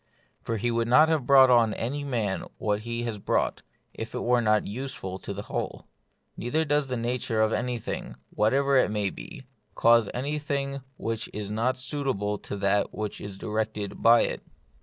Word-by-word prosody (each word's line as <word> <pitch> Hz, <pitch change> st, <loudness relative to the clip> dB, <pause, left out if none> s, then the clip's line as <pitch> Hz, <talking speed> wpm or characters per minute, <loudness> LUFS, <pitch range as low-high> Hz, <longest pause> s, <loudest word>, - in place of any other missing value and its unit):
For 115 Hz, -, -2 dB
he 120 Hz, +3 st, 0 dB
would 115 Hz, 0 st, 0 dB
not 155 Hz, +7 st, +6 dB
have 155 Hz, -6 st, 0 dB
brought 135 Hz, -2 st, +7 dB
on 115 Hz, -3 st, +4 dB
any 140 Hz, +5 st, -3 dB
man 115 Hz, -8 st, -1 dB
what 105 Hz, -1 st, 0 dB
he 115 Hz, +2 st, -4 dB
has 115 Hz, -3 st, -3 dB
brought, -, -, 0 dB, 0.3 s
if -, -, -6 dB
it -, -, -2 dB
were 120 Hz, 0 st, +3 dB
not 105 Hz, -2 st, +2 dB
use 130 Hz, +6 st, -5 dB
ful 95 Hz, 0 st, -6 dB
for -, -, -7 dB
the 100 Hz, +1 st, -5 dB
whole. -, -, -4 dB, 0.5 s
Neither 155 Hz, +7 st, 0 dB
does 145 Hz, -1 st, +1 dB
the 125 Hz, -1 st, -2 dB
nature 115 Hz, -1 st, -1 dB
of 110 Hz, 0 st, +3 dB
anything, 125 Hz, -3 st, -3 dB, 0.2 s
whatever 135 Hz, +6 st, +2 dB
it 130 Hz, -, +4 dB
may 105 Hz, -2 st, 0 dB
be, 155 Hz, -7 st, -10 dB, 0.3 s
cause 115 Hz, -2 st, +5 dB
anything 140 Hz, 0 st, -2 dB, 0.2 s
which 115 Hz, 0 st, -3 dB
is 105 Hz, -1 st, -5 dB
not 120 Hz, +4 st, 0 dB
suitable 130 Hz, -7 st, -2 dB
to 100 Hz, -, -6 dB
that 100 Hz, +1 st, +1 dB
which 105 Hz, -1 st, -4 dB
is 100 Hz, -2 st, -7 dB
directed 105 Hz, -1 st, -3 dB
by 115 Hz, +1 st, +7 dB
it. -, -, -1 dB
115 Hz, 180 wpm, -27 LUFS, 105-135 Hz, 0.5 s, brought